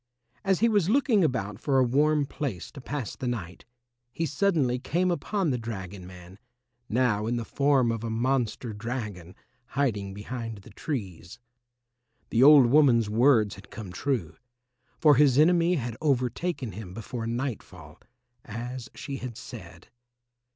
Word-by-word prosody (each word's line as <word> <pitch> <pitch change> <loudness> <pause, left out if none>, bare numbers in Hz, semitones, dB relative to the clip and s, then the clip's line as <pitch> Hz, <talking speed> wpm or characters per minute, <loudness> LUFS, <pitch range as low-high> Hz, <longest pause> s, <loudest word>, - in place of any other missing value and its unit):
As 195 -2 +1
he 230 - +5
was 205 -6 +2
looking 235 -5 +3
about 105 -8 -1
for 135 +1 +1
a 130 - +5
warm 145 +4 +2
place 135 - -5
to 140 - -10
pass 135 -4 -4
the 130 - -5
night, 100 -8 -5 0.5
he 165 - -2
suddenly 150 -6 +1
came 175 +7 0
upon 185 -1 -1
the 125 - -1
dragon 95 -5 -7
man, 90 +1 -13 0.5
now 110 -3 +1
in 120 - 0
the 120 -1 -3
form 135 -3 +2
of 115 -1 -4
a 115 - -3
monster 120 0 -1
dragon, 105 -6 -6 0.3
hiding 105 -9 -1
behind 115 -1 -6
the - - -14
trees. 95 - -5 0.9
The 115 - +2
old 140 -1 +9
woman's 120 -5 +4
words 115 -3 +4
had 100 +1 -13
come 105 -5 -8
true, 95 - -2 0.6
for 150 -4 +5
his 140 -3 +5
enemy 170 +3 +4
had 120 -6 -3
overtaken 135 0 -1
him 95 -2 -9
before 115 +1 -5
nightfall, 110 - -5 0.4
as 120 +2 -6
she 140 -2 -5
had 125 -4 -7
said. - - -11
125 Hz, 150 wpm, -27 LUFS, 105-145 Hz, 0.9 s, old